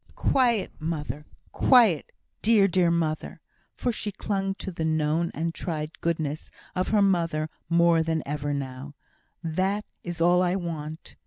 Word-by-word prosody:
"Quiet, 240 -6 +2
mother! 150 -2 -4 0.2
quiet, 225 - +4 0.3
dear, 210 -3 +5
dear 180 -2 +3
mother" 165 -2 -1 0.4
(for 245 - 0
she 215 -2 -4
clung 195 -1 -2
to 190 - -6
the 165 -2 -4
known 160 +1 +1
and 165 +2 -1
tried 155 -3 -3
goodness 155 -3 -2 0.2
of 185 - -1
her 210 -2 +3
mother 165 -5 +1 0.2
more 170 -1 +4
than 160 -1 -1
ever 145 0 -2
now), 140 0 -5 0.5
"that 190 +6 0 0.2
is 175 -1 -5
all 175 +2 +4
I 180 0 +2
want." 160 -3 -5
170 Hz, 145 wpm, -26 LUFS, 155-190 Hz, 0.5 s, dear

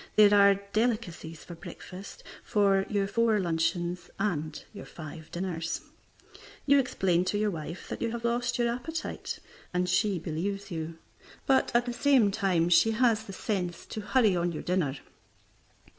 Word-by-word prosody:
There 205 -1 +7
are 200 -1 +7 0.2
delicacies 210 -8 -1
for 175 - -9
breakfast, 180 +3 -10 0.2
for 195 -2 +2
your 200 -1 +1
four 220 +1 +2
luncheons 175 0 -1
and 160 -7 -2
your 205 - -9
five 155 0 -9
dinners. 170 -2 -3 0.8
You 280 0 +6
explain 185 -9 +1
to 205 - 0
your 210 0 +1
wife 165 +1 -6
that - - -5
you 230 - 0
have 235 0 -4
lost 240 0 0
your 240 -1 +2
appetite, 315 +6 -5 0.4
and 180 0 +1
she 190 +2 +2
believes 195 +5 -3
you, 160 0 -4 0.5
but 265 -1 +3
at 240 0 +4
the 245 - -3
same 255 -6 +4
time 190 -5 +1
she 175 +6 +5
has 225 -2 +3
the 195 - -8
sense 180 -4 -3
to 215 - -6
hurry 215 -2 +3
on 175 0 0
your 160 - -5
dinner. 170 -7 0
195 Hz, 160 wpm, -29 LUFS, 170-225 Hz, 0.8 s, There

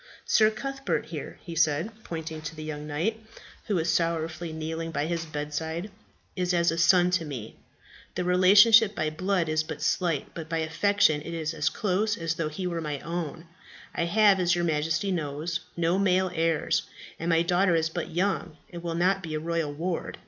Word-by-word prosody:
"Sir 215 -1 +5
Cuthbert, 275 +5 -3
here," - - -7
he 170 -3 -7
said, 160 +5 +2
pointing 160 -1 -6
to 155 +1 -6
the 155 - -7
young 150 -1 -6
knight, 205 +10 -2 0.4
who 210 - 0
was 170 -1 +1
sorrowfully 165 0 -1
kneeling 160 +1 -4
by 150 -2 -1
his 165 0 -2
bedside, 160 +5 -4 0.4
"is 180 -2 0
as 170 -1 +3
a 165 - -3
son 180 +1 +5
to 180 -2 +1
me. 125 -8 -7 0.6
The 180 - -1
relationship 200 +4 +6
by 155 0 -1
blood 185 +1 0
is 155 0 +1
but 155 -1 -6
slight, 165 -1 0
but 160 -2 -7
by 165 - -1
affection 160 0 +2
it 170 +2 -6
is 160 -1 -2
as 155 -1 +1
close 210 +2 0
as 165 -1 -1
though 165 -1 -2
he 170 +5 -5
were 170 -2 -2
mine 150 -3 -4
own. 165 -1 -4 0.5
I 170 - 0
have, 205 +1 +4
as 175 -1 +3
your 175 0 0
Majesty 160 +4 0
knows, 155 0 -2 0.2
no 170 +2 +2
male 185 -1 +2
heirs, 165 -2 +1 0.4
and 165 - -2
my 165 0 +4
daughter 180 +1 +3
is 160 0 +1
but 170 0 -4
young, 180 -2 -1
and 170 -1 -7
will 170 -1 -3
now 185 +3 +2
be 165 -4 -5
a - - -1
royal 165 -1 -1
ward. 165 +4 -3
165 Hz, 190 wpm, -27 LUFS, 155-185 Hz, 0.6 s, relationship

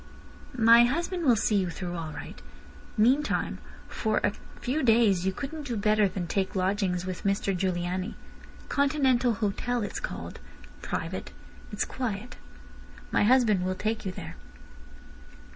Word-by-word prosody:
"My 230 +1 +7
husband 340 +6 -1
will 245 -4 +6
see 210 -1 +2
you 185 -2 +1
through 175 +1 -5
all 165 -2 -4
right. 145 - -9 0.6
Meantime 260 +8 +2 0.3
for 215 -2 -1
a 200 - +2 0.3
few 275 +6 -1
days 220 -6 +4
you - - +2
couldn't 285 +7 -6
do 235 -3 -2
better 210 0 +3
than 185 -1 -4
take 190 +3 -1
lodgings 185 -1 0
with 185 -1 -5
Mr 200 -1 0
Giugliani. 180 +2 -2 0.5
Continental 265 -4 +2
Hotel 230 +3 -1
it's 205 - -4
called. - - -6 0.4
Private. - - -4 0.4
It's - - -1
quiet. 240 -2 -4 0.7
My - - +3
husband 225 -6 +4
will 185 0 -1
take 220 +3 -2
you 190 - -3
there." 165 -3 -8
210 Hz, 140 wpm, -28 LUFS, 185-245 Hz, 0.7 s, My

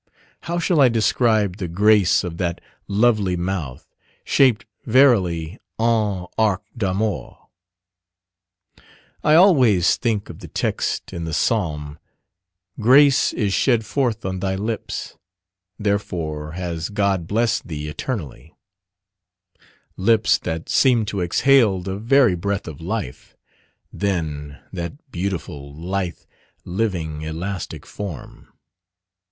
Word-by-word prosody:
How 170 +1 -4
shall 170 -2 +2
I 130 - +7
describe 110 -3 +2
the 95 -4 -4
grace 100 +2 +3
of 85 -2 -5
that 85 -1 -2 0.3
lovely 105 -3 +2
mouth, 85 -7 -4 0.4
shaped 120 -5 +3 0.2
verily 100 - +3 0.2
"en 110 -5 +1
arc 105 -4 +2
d'amour." 105 -1 -2 1.9
I 155 +1 +5
always 130 - +5
think 110 -4 -1
of - - -10
the - - -10
text - - -2
in 85 -1 -4
the 80 -2 -3
Psalm, 75 - -1 0.8
"Grace 135 +4 +5
is 100 -4 -1
shed 115 -2 +2
forth 125 -7 -1
on 95 -1 -3
thy 95 0 -1
lips, 110 +3 -4 0.6
therefore 85 -7 -2
has 85 -2 -4
God 100 -4 0
blessed 115 +3 0
thee 75 -2 -5
eternally" 75 - -6 1.4
lips 110 +3 +3
that 80 -1 -4
seemed 120 -5 +3
to 100 -4 -3
exhale 110 +2 +3
the 95 +1 -4
very 120 0 +4
breath 100 +3 -2
of 80 -1 -8
life. 95 - -5 0.6
Then 75 -7 -3 0.2
that 95 - -7
beautiful, 85 -7 -4
lithe, 90 +2 -3 0.4
living, 90 -6 -2
elastic 85 +4 -5
form! 100 -7 -8
100 Hz, 110 wpm, -21 LUFS, 85-115 Hz, 1.9 s, I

